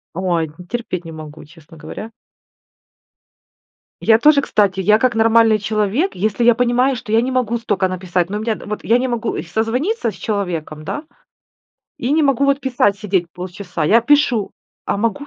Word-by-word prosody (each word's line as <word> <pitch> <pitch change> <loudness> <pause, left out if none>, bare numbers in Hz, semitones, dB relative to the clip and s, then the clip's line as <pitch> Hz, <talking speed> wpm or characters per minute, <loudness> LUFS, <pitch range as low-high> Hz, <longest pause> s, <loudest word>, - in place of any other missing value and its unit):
Ой, 170 -3 -1 0.2
терпеть 225 -7 -4
не 165 - -8
могу, 155 -1 -10
честно 165 +1 -17
говоря. 215 +8 -8 1.9
Я 225 0 +4
тоже, 295 +2 +5
кстати, 200 -7 +1
я 210 +3 +4
как 250 0 +1
нормальный 225 0 +4
человек, 215 - -1
если 215 +5 -1
я 240 0 +6
понимаю, 250 +3 +2
что 245 -3 -7
я 225 - +4
не 255 +2 -2
могу 245 -2 0
столько 205 -5 0
написать, 185 -1 -2
ну, 205 - -3
у - - -4
меня 220 0 -1
вот 210 0 -5
я 235 +2 +3
не 260 - -1
могу, 235 -2 -2
э, - - -3
созвониться 230 - -1
с - - -14
человеком, 170 -7 -4
да? 295 - -5 1.0
И 245 - -2
не 315 +1 +3
могу 275 -2 +2
вот 280 0 +2
писать 245 -7 +1
сидеть 190 -4 0
полчаса. 180 -2 -5
Я 220 +9 +5
пишу, 250 -5 +2 0.3
а - - 0
могу 230 +6 -2
220 Hz, 175 wpm, -18 LUFS, 185-245 Hz, 1.9 s, я